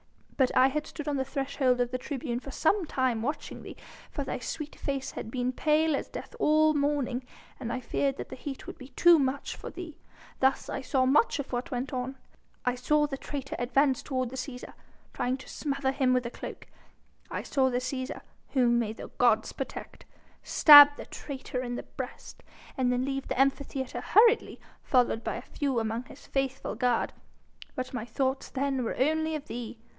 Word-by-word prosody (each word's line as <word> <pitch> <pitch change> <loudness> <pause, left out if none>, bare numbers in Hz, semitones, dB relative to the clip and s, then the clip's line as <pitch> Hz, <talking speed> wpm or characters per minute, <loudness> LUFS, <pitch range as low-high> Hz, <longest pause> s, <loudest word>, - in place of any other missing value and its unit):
But 260 -2 +2
I 260 +1 +6
had 300 +2 -3
stood 300 -1 -7
on 290 -1 0
the 265 - +1
threshold 270 -2 0
of 245 0 +1
the 255 - -2
tribune 250 -3 -3
for 275 - -10
some 340 +6 +1
time 255 -5 0
watching 290 +5 -4
thee, - - -10 0.3
for 285 - -3
thy 270 - -4
sweet 295 +5 -5
face 275 -2 -3
had 220 - -6
been 250 +1 -1
pale 310 +3 +2
as - - -3
death - - -8
all 310 0 +4
the 295 - +1
morning, 280 -3 0 0.4
and 235 -3 -4
I 255 - -2
feared 275 +1 -1
that - - -6
the - - -7
heat 270 0 -7
would - - -9
be 255 - -9
too 340 +4 +6
much 275 0 -1
for - - -8
thee. 340 -4 -9 0.4
Thus 265 0 +2
I - - -3
saw 260 0 +1
much 290 - +4
of 285 -2 -5
what 245 +6 -2
went 255 0 -3
on. 255 +1 -3 0.5
I 250 - +2
saw 295 +4 +2
the 270 -2 -5
traitor 275 -2 -5
advance 260 +2 +2
toward 255 -3 -2
the - - -6
Cæsar, 255 -1 -6 0.4
trying 250 +1 -1
to 265 - -13
smother 275 -2 -1
him 265 -1 +2
with 250 -1 +1
a 235 - -4
cloak. - - -8 0.6
I - - -4
saw 265 -2 +2
the 245 - 0
Cæsar 255 +1 -3 0.3
whom 240 -3 +4
may 220 -2 -1
the - - -9
gods 225 -3 +3
protect 270 - -7 0.4
stab 290 -2 +10
the - - -7
traitor 265 -3 -5
in 245 -1 -3
the - - -5
breast, - - -8 0.3
and 255 -1 +1
then 250 +1 0
leave 270 0 -3
the - - -2
Amphitheatre 270 -1 0
hurriedly, 460 +2 +4 0.2
followed 245 -3 +2
by - - -2
a - - -6
few 280 -4 -2
among 225 +2 -2
his 270 - -14
faithful 270 -1 -2
guard. 245 -2 +1 0.6
But 255 0 -4
my 235 -3 -3
thoughts 265 +3 -1
then 270 -1 -1
were 230 - -2
only 315 +3 +1
of 300 -1 -5
thee. 240 -2 -6
265 Hz, 200 wpm, -29 LUFS, 250-285 Hz, 0.6 s, stab